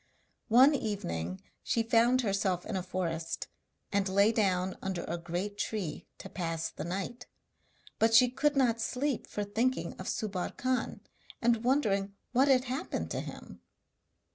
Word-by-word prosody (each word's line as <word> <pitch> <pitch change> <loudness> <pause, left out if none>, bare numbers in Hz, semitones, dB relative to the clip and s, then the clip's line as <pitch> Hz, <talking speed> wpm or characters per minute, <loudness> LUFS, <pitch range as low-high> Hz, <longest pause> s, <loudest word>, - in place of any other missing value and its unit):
One 255 +6 +7
evening 90 - -3 0.2
she 230 - +1
found 235 +2 +4
herself 195 -4 0
in 220 - -4
a 190 - 0
forest, 170 -3 -3 0.4
and 200 -1 +1
lay 200 +3 +4
down 190 -4 +1
under 190 -2 -3
a 170 +1 -3
great 180 +5 -4
tree 195 -9 -3
to - - -9
pass 165 -3 -3
the - - -6
night. 195 +8 -4 0.7
But 225 0 +4
she 250 +2 +8
could 295 +3 +1
not 240 -4 +2
sleep 265 +2 -1
for 210 - -3
thinking 235 +6 0
of - - -4
Subbar 195 -4 -3
Khan, 255 0 -1 0.4
and 235 -1 +2
wondering 205 -7 +1 0.2
what 260 +3 +4
had 260 -2 +5
happened 265 +6 -3
to - - -1
him. - - -9
210 Hz, 150 wpm, -31 LUFS, 185-245 Hz, 0.7 s, she